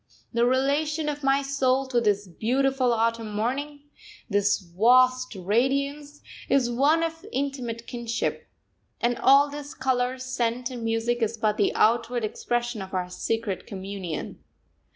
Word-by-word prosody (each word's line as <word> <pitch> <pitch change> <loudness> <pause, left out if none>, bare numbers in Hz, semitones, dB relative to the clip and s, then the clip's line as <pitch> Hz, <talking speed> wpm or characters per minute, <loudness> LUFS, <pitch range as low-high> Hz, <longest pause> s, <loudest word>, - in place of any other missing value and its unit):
The 235 +1 +3
relation 295 +4 +1
of 295 0 -5
my 275 +1 +3
soul 270 -1 +1
to 245 -2 +2
this 205 -2 +1
beautiful 255 +7 +1
autumn 230 -1 0
morning, 280 +7 -2 0.5
this 205 -2 +2
vast 250 +7 +3
radiance, 275 +9 -1 0.3
is 255 -2 +2
one 290 +7 +3
of 325 0 -4
intimate 255 - -3
kinship; 235 -2 -3 0.5
and 240 +1 +1
all 275 +2 +6
this 290 0 -8
colour, 255 -1 0
scent, 250 -1 -2
and 245 -2 -6
music 225 +1 0
is 225 0 0
but 215 -1 0
the 200 - +2
outward 235 +1 +2
expression 240 +1 -2
of 190 0 -7
our 180 -1 -2
secret 225 0 -3
communion. 190 -4 -6
245 Hz, 135 wpm, -26 LUFS, 225-270 Hz, 0.5 s, all